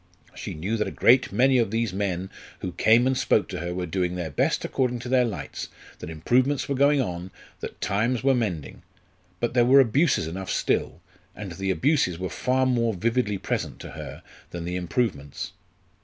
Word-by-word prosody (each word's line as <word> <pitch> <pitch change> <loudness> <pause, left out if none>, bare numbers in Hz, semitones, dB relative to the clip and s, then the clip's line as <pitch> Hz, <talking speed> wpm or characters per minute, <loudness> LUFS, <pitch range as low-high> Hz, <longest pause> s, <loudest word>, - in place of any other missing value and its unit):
She - - -6
knew 95 +9 -2
that 105 - 0
a - - -7
great 125 +2 +5
many 130 +5 +4
of 115 - +1
these 115 -2 -1
men 95 -2 -2 0.3
who 90 - -3
came 115 +7 +4
and 130 0 +2
spoke - - +2
to - - -4
her 85 +1 -3
were 90 0 -3
doing 90 +1 -1
their 85 -4 -4
best - - 0
according 125 -2 0
to 120 - -6
their 125 -1 +4
lights, 90 -11 -5 0.3
that - - -7
improvements 125 - +1
were 140 - 0
going 140 +2 +4
on, 90 -6 -3 0.3
that - - -7
times 115 +5 0
were 135 0 +4
mending. 100 - -3 0.6
But 120 0 -1
there 120 -1 +4
were 130 +3 +6
abuses 135 - +3
enough 95 +4 -5
still, - - 0 0.3
and 100 -3 -7
the 95 +3 -3
abuses 125 - +2
were 95 +1 -3
far 130 +1 +1
more 115 -4 +1
vividly 115 +1 0
present - - -3
to - - -8
her - - -8 0.3
than 85 -1 -6
the 90 +1 -3
improvements. 90 - -2
110 Hz, 190 wpm, -25 LUFS, 90-125 Hz, 0.6 s, were